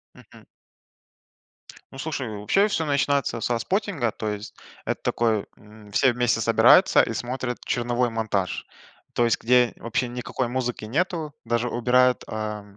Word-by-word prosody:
Мгм. - - -17 1.5
Ну 135 - -11
слушай, 145 -3 -3
вообще 195 - +2
всё 165 -6 -1
начинается 140 -4 0
со 120 -1 0
споттинга, 185 - -1
то 110 - -4
есть 105 0 -6 0.3
это - - -3
такой, 110 -3 +1
м, 105 0 -16
все 130 +4 +4
вместе 120 -1 +1
собираются 110 - +6
и - - -3
смотрят 125 0 -3
черновой 120 0 0
монтаж, 110 -6 -2 0.5
то 120 - +2
есть 115 - +1
где 125 0 +3
вообще 115 +2 -2
никакой 125 0 -3
музыки 125 -3 -3
нету, 155 +3 -2
даже 120 +1 0
убирают 125 +1 +2
а, 110 -1 -4
м 100 -1 -19
120 Hz, 145 wpm, -24 LUFS, 110-130 Hz, 1.5 s, собираются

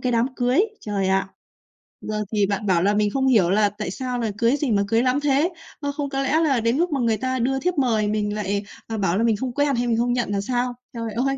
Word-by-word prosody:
cái 250 -1 0
đám 230 +2 +2
cưới, 250 +6 +2 0.2
trời 200 -3 -1
ạ! 195 0 +1 0.7
Giờ 215 0 -3
thì 205 -1 +3
bạn 205 +1 -2
bảo 180 -3 +2
là 205 - +3
mình 210 0 +2
không 265 +4 0
hiểu 210 -9 +4
là 205 +1 +3
tại 210 -2 -5
sao 250 +3 -3
là 225 -3 -1
cưới 235 +4 +3
gì 280 -5 -1
mà 200 -1 +3
cưới 230 +3 +2
lắm 255 +2 +2
thế? 295 +3 +2 0.3
Ơ, 285 -1 -2
không 285 0 -4
có 270 0 -2
lẽ 280 +4 +2
là 280 -6 +2
đến 230 +3 +1
lúc 345 +2 +1
mà 280 - 0
người 230 -3 +1
ta 260 +3 -2
đưa 265 +3 0
thiếp 360 +3 -1
mời 225 -6 +2
mình 210 0 -1
lại, 205 -1 -2 0.2
ờ, 225 -1 -4
bảo 190 -2 +1
là 225 - +1
mình 230 -2 +3
không 250 +3 -4
quen 285 0 +1
hay 240 +1 0
mình 230 -1 +1
không 240 +1 +1
nhận 245 -3 -1
là 200 - 0
sao? 245 +3 -1 0.2
Trời 230 -2 -4
ơi, 270 +4 0
235 Hz, 275 wpm, -23 LUFS, 210-265 Hz, 0.7 s, hiểu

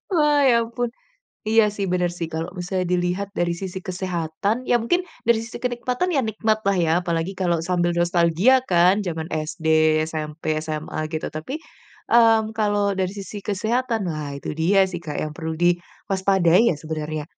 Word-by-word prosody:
Wah, 295 -3 +4
ya 235 -1 +4
ampun. 235 +1 -3 0.5
Iya 220 0 +4
sih, 195 -3 -2
benar 180 -1 +1
sih. 165 -2 -5
Kalau, 165 +3 -4
bisa 180 +1 -3
dilihat 180 +3 -1
dari 175 0 0
sisi 185 +1 -5
kesehatan 185 +4 -2
ya, 245 -1 +2
mungkin 350 +11 +1 0.2
dari 230 -1 +3
sisi 230 - -8
kenikmatan 250 +8 -1
ya, 275 - +2
nikmat 220 0 0
lah 200 0 +1
ya, 165 -2 +2
apalagi 170 +2 -2
kalau 175 -3 0
sambil 175 +1 0
nostalgia 175 +8 +3
kan, 180 0 +3
jaman 165 -4 -4
SD, 160 +1 -4 0.4
SMP, 155 0 -3
SMA, 155 0 -5
gitu. 155 -1 -3
Tapi, 210 - -5 0.5
mmm, 225 -2 +4
kalau 205 -2 +1
dari 190 -1 -1
sisi 200 0 -8
kesehatan 220 +1 -1
lah, 150 -4 -4
itu 150 - -5
dia 190 +5 +3
sih 175 -2 -6
Kak, 155 -3 -5
yang 155 0 -3
perlu 160 -1 -5
diwaspadai 185 +2 +2
ya, 160 - -1
sebenarnya 155 -1 -4
185 Hz, 165 wpm, -23 LUFS, 165-220 Hz, 0.5 s, Wah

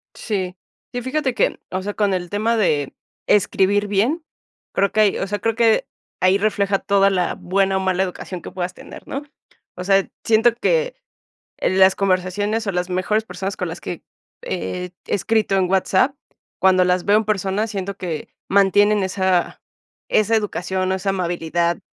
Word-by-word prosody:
Sí, 190 -4 -3 0.4
sí 245 - -3
fíjate 260 0 -1
que, - - +1
o 185 0 -2
sea, 205 +1 -4
con 205 -2 +1
el 180 -1 -3
tema 220 +3 +1
de 150 -10 +1 0.3
escribir 205 0 +2
bien, 235 - +1 0.5
creo 200 0 +2
que 215 - +2
hay, 210 -2 +3
o - - -2
sea, 205 +1 -2
creo 225 +3 0
que 225 -1 +3 0.3
ahí 185 +2 +4
refleja 200 -1 +1
toda 200 0 +3
la 180 -2 0
buena 195 +1 0
o - - +1
mala 190 0 +1
educación 180 -1 -5
que - - -8
puedas 180 0 -4
tener, - - -12
¿no? 275 - -4 0.5
O 180 - -5
sea, 195 0 +3 0.2
siento 225 +1 +4
que - - 0 0.6
las 190 0 +4
conversaciones 195 +3 0
o - - +1
las 180 0 -2
mejores 185 +4 0
personas 190 0 -5
con 180 -2 -3
las 165 - -7
que - - -6 0.4
he 180 - -4
escrito 210 0 +1
en 185 -2 +2
WhatsApp, 190 +7 +2 0.5
cuando 185 -1 +5
las 180 0 +1
veo 205 +1 +5
en 220 - 0
personas, 205 +1 -1
siento 200 -1 -4
que 165 -6 -5 0.2
mantienen 205 +1 +4
esa 190 -1 0 0.5
esa 215 +1 +3
educación 190 -3 -1
o - - +2
esa 190 +1 -2
amabilidad 170 -2 -1
195 Hz, 170 wpm, -21 LUFS, 185-210 Hz, 0.6 s, cuando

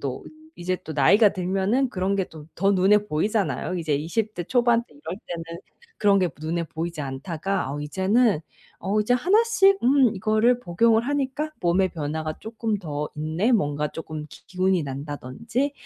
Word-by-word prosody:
또 135 -2 -4 0.3
이제 180 +1 -2
또 160 - -7
나이가 200 +9 +5
들면은 195 +8 0
그런 190 +1 -1
게 190 - +1
또 155 -3 -13
더 195 +3 +3
눈에 205 +2 +4
보이잖아요. 180 -1 -1
이제 160 -3 -1
20 200 +9 -2
대 175 - -3
초반 240 +3 +2
때 240 - -23
이럴 285 -10 -6
때는 170 0 -6 0.4
그런 200 -1 +4
게 180 -2 +2
눈에 165 +2 -2
보이지 165 0 -5
않다가 155 +5 -3
어 145 - -4
이제는 190 +5 +2 0.4
어 200 +3 0
이제 215 +4 +1
하나씩 395 - +4
"음 255 -5 +4
이거를 220 +5 +2
복용을 225 +3 +2
하니까 285 +2 -2
몸의 180 +1 +2
변화가 155 0 -4
쪼끔 220 -1 -3
더 150 -4 -4
있네." 160 +10 0
뭔가 150 -7 +1
쪼끔 155 -1 -7
기 - - -15
기운이 185 -1 +1
난다든지. 145 - -3
190 Hz, 320 characters per minute, -24 LUFS, 155-225 Hz, 0.4 s, 나이가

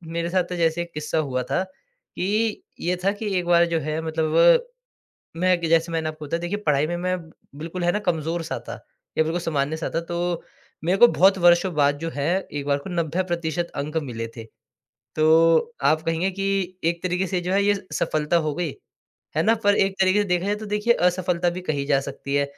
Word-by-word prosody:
मेरे 170 0 -1
साथ 185 0 +2
तो 180 - -3
जैसे 165 0 +1
एक 170 0 -7
किस्सा 150 +1 -3
हुआ 130 -4 -1
था, 135 +9 -1
कि 220 - -4 0.2
ये 180 +1 0
था 195 - +4
कि 205 -2 -3
एक 175 - -1
बार 170 0 +5
जो - - +2
है 155 +2 -3
मतलब 160 -1 -1
ब 170 - +7 0.8
मैं 185 -1 +3
कि 165 - -2
जैसे 165 +1 +2
मैंने 160 -1 -1
आपको 155 -1 -7
बताया 165 +3 -2
देखिए 180 +4 -3
पढ़ाई 150 0 +3
में 175 +1 -2
मैं 185 +1 -1 0.4
बिल्कुल 170 +3 -5
है 175 - +3
ना 210 - 0
कमज़ोर-सा 165 -3 -2
था, - - -4 0.4
या - - +6
बिल्कुल 165 +2 -1
सामान्य-सा 160 0 -1
था। 165 - +1
तो 175 0 -2 0.4
मेरे 185 +3 +2
को 240 - +9
बहुत 195 +1 +4
वर्षों 175 +1 +4
बाद 145 -1 +2
जो 165 +1 -4
है 145 0 -2 0.3
एक 145 -1 -4
बार 140 0 +2
को 160 +6 -9
90% 170 0 -1
अंक 150 +3 -4
मिले 115 -4 -5
थे। 115 - -7 0.7
तो 165 +8 +4
आप 155 +2 +3
कहेंगे 165 +3 0
कि 195 +1 -3 0.4
एक 170 0 0
तरीके 185 +1 0
से 180 0 -1
जो 180 +2 -3
है 200 +1 +3
ये 205 0 +4 0.2
सफलता 155 +2 0
हो 150 -2 -1
गई, 170 -3 -2 0.7
है 160 - +3
ना। 225 +6 +4
पर 205 0 +5
एक 195 0 +2
तरीके 190 +2 +4
से - - -3
देखा 180 +1 +1
जाए 205 - +1
तो 215 0 -8
देखिए 210 +3 +2 0.2
असफलता 180 -1 0
भी 180 +1 -5
कही 140 -2 0
जा 140 -2 +3
सकती 140 0 -6
है। 140 0 +3
170 Hz, 215 wpm, -23 LUFS, 155-185 Hz, 0.8 s, को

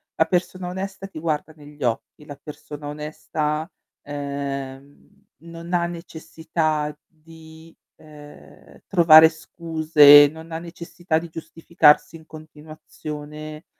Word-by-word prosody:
La 160 - +2
persona 180 +1 -2
onesta 195 +1 -6
ti 195 - -10
guarda 155 -1 -3
negli 145 -1 -12
occhi, 120 +5 -4
la 145 -2 -11
persona 150 -1 -10
onesta, 150 +1 -4 0.3
ehm, 140 -1 -7 0.3
non 170 +1 -10
ha 175 -1 +1
necessità 160 -2 -4
di, 160 0 -17 0.2
ehm, 150 -1 -16
trovare 160 -3 +7
scuse, 155 -3 +5
non 160 +1 -13
ha 160 - -4
necessità 170 0 -4
di 170 +1 -10
giustificarsi 160 -1 +1
in 160 - -19
continuazione, 155 0 -10
155 Hz, 110 wpm, -22 LUFS, 150-165 Hz, 0.3 s, trovare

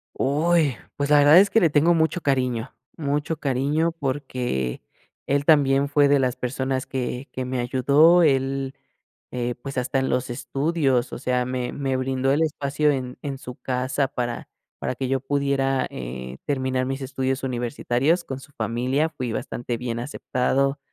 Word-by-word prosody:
Uy, 150 0 +2 0.2
pues 145 0 -2
la 145 -1 +6
verdad 145 +4 +7
es 200 +1 +5
que 225 - +4
le 170 - +4
tengo 155 +4 +4
mucho 160 +2 +1
cariño. 125 -3 0 0.2
Mucho 150 +1 -2
cariño 145 +4 +1
porque 130 - -3 0.5
él 140 +1 +1
también 140 -2 +4
fue 145 0 +4
de 140 0 +4
las 130 -2 +1
personas 130 +1 -2
que 125 0 -3
que 130 -1 -4
me 125 0 -2
ayudó. 140 +8 +5
Él, 135 -1 +1 0.6
eh, 120 -1 -2
pues 135 -1 -5
hasta 130 +2 0
en 130 - 0
los 130 0 0
estudios, 135 -1 0
o - - -5
sea, 125 -1 0
me 125 -1 -3
me 135 -2 -1
brindó 130 0 0
el 150 - +2
espacio 150 -1 +1
en 130 -3 -3
en 140 -2 -4
su 125 -2 -9
casa 130 +2 -1
para 120 -2 -4 0.3
para - - -3
que 130 0 -3
yo 135 -1 0
pudiera, 135 -1 0
eh, 65 +1 -7
terminar 130 -2 0
mis 135 +1 -3
estudios 130 0 -2
universitarios 130 +6 0
con 135 0 -6
su 140 - -15
familia. 125 +7 0
Fui 125 -6 -4
bastante 120 +1 -4
bien 120 -1 -4
aceptado. 135 +2 0
135 Hz, 165 wpm, -24 LUFS, 125-145 Hz, 0.6 s, verdad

